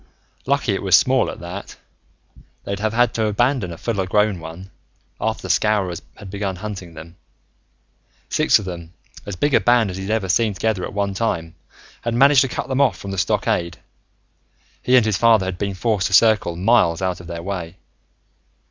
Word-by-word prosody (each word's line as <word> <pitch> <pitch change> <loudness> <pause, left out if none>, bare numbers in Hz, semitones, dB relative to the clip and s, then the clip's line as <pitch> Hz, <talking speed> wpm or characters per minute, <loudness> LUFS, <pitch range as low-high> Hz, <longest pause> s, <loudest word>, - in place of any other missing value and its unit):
Lucky 140 -6 +1
it 95 - -2
was 95 -2 +4
small, 130 +5 +2
at - - -8
that. 90 +3 -8 0.9
They'd 100 0 -4
have 110 +1 -1
had 120 0 +2
to 110 -1 0
abandon 120 -2 0
a 85 - -8
full 105 -2 -2
grown 105 0 +1
one, 85 +4 -10 0.5
after - - -2
the - - -6
Scowrers 95 -6 0 0.2
had 100 -2 -10
began 100 -2 -3
hunting 95 -4 -7
them. 85 +3 -12 1.1
Six - - +3
of 105 - -7
them, 85 -2 -8 0.3
as 100 - -4
big 145 +10 0
a - - +6
band 120 -4 +3
as 90 - -7
he'd 95 +1 -6
ever 110 -3 0
seen 105 +3 +1
together 105 -3 -1
at - - -8
one 100 -1 -1
time, 85 -6 -2 0.5
had 115 0 -2
managed 135 +1 +6
to 135 - +2
cut - - -4
them 130 +1 0
off 140 - +2
from 100 - -7
the 95 - -4
stockade. 85 -1 0 1.0
He 125 - +3
and 120 - +4
his 110 -3 +1
father 115 -4 +4
had 95 -1 -4
been 100 -1 -2
forced 100 -1 0
to - - -5
circle 105 -4 +4
miles 90 -3 +2
out 90 -1 -1
of 90 - -12
their 85 -1 -6
way. 90 -2 -5
100 Hz, 190 wpm, -21 LUFS, 90-115 Hz, 1.1 s, a